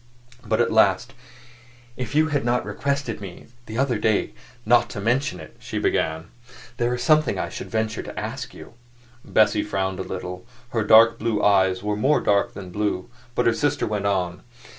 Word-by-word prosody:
But - - 0
at - - +2
last, - - +3 0.8
"If 125 +2 -5
you 155 +1 +4
had 145 -2 0
not 120 +1 0
requested 140 -6 -2
me 95 -3 -9 0.2
the 110 - -6
other 130 -4 +1
day 110 -1 +1 0.3
not 120 0 +4
to 100 - -6
mention 120 -2 0
it," 80 - -12
she - - -6
began, 80 +1 -1 0.5
"there 120 0 0
is 125 - -4
something 155 +1 +3
I - - -2
should - - -7
venture 110 0 -1
to - - -7
ask - - -5
you." - - -12 0.5
Bessie 110 -1 +3
frowned 95 -2 -2
a - - -1
little; 90 -1 -6 0.3
her 115 -3 -1
dark 115 +2 +6
blue 110 -2 -1
eyes 95 -2 +3
were 105 0 -1
more 135 +8 +2
dark 100 -1 +1
than 95 -3 -8
blue. 105 -1 -2 0.2
But 125 - +1
her 115 - +4
sister 145 +4 0
went 105 -1 -1
on. 90 -2 -1
110 Hz, 185 wpm, -23 LUFS, 95-120 Hz, 0.8 s, dark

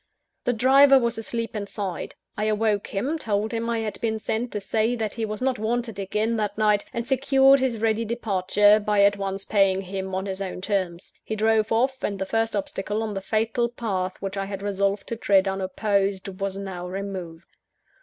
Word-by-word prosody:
The 245 - +2
driver 270 +4 +6
was 235 -2 0
asleep 230 0 -4
inside. 200 -3 -4 0.2
I 210 - -1
awoke 215 -1 +1
him; 270 +11 -2
told 215 -3 -1
him 230 0 -2
I 230 -1 0
had 215 -1 -5
been 220 -1 0
sent 225 +2 -2
to 210 - -1
say 220 +4 0
that 220 -3 -3
he 225 - -2
was 215 +2 -4
not 260 -3 0
wanted 225 -1 -2
again 215 +4 -1
that 210 -1 -2
night: 210 -1 +3
and 235 0 -4
secured 270 +1 +5
his 260 -3 0
ready 220 +1 +1
departure, 210 -2 +3
by 210 -1 +2
at 200 0 +4
once 195 0 -3
paying 195 -2 +3
him 190 0 -4
on 190 +1 -2
his 190 0 -4
own 190 -2 -4
terms. 185 -3 -2
He 220 - -3
drove 220 0 +2
off; 255 +3 +1
and 200 - -1
the 190 - -2
first 225 +2 0
obstacle 205 +2 -2
on 215 -1 -3
the 195 - -3
fatal 225 +4 0
path 190 -6 -3
which 195 0 -3
I 195 - -1
had 195 0 -6
resolved 200 0 0
to 230 - -2
tread 200 -3 +3
unopposed, 195 0 0
was 195 -1 -2
now 190 -3 -5
removed. 185 -3 -6
210 Hz, 195 wpm, -25 LUFS, 195-225 Hz, 0.2 s, driver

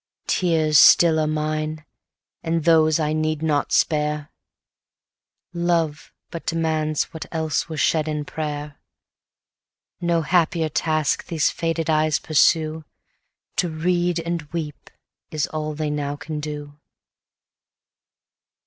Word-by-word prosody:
Tears 160 -4 +3
still 165 -2 +7
are 155 - +1
mine, 155 0 -2 0.6
and 165 -1 -1
those 160 -1 +4
I 155 -1 0
need 155 0 -1
not 150 -2 0
spare, 150 -1 +1 1.2
Love 170 -3 -1 0.2
but 170 - -6
demands 155 -2 -1
what 160 - -7
else 160 0 -1
were 160 - -5
shed 155 0 +1
in 150 -1 -3
prayer; 150 -1 -5 1.2
No 170 -1 +1
happier 165 -1 +1
task 155 -1 0
these 160 -3 +1
faded 165 -1 -2
eyes 155 -1 +2
pursue; 155 0 +2 0.7
To 175 - +1
read 175 +2 0
and 170 0 -2
weep 155 -3 -6 0.4
is 155 -1 -1
all 155 -1 -4
they 155 0 -2
now 145 -1 -2
can 150 +1 -6
do. 145 -1 -7
155 Hz, 115 wpm, -22 LUFS, 150-165 Hz, 1.2 s, still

